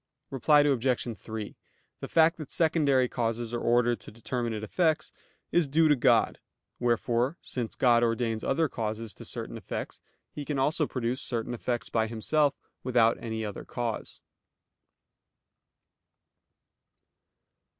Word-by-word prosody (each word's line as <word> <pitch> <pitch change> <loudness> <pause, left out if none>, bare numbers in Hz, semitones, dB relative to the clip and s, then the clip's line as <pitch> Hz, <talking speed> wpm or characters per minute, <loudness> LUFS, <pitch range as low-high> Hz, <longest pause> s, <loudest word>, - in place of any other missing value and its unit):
Reply 145 +3 +4
Obj. 125 -4 +1
3: 110 -2 -7 0.4
The - - -5
fact 165 0 +4
that 155 -4 -8
secondary 150 -6 +3
causes 115 -1 -2
are 120 - -1
ordered 120 0 +2
to - - -11
determinate 115 0 -3
effects 155 - +1 0.4
is 175 -3 +3
due 160 +3 +4
to 150 - +6
God; 125 - +3 0.4
wherefore 120 +4 +1
since 120 -3 -4
God 120 -2 +4
ordains 115 -1 0
other 160 -1 +1
causes 110 -3 -4
to - - -11
certain - - -4
effects - - -6 0.3
He 150 - -6
can 145 0 -3
also 150 +3 +1
produce 125 0 -2
certain 120 0 -2
effects 120 0 -3
by 110 -1 +1
Himself 140 +6 +1 0.3
without 120 -3 +3
any 110 -1 -3
other 105 - -6
cause. 120 -3 -4
120 Hz, 130 wpm, -28 LUFS, 115-145 Hz, 0.4 s, to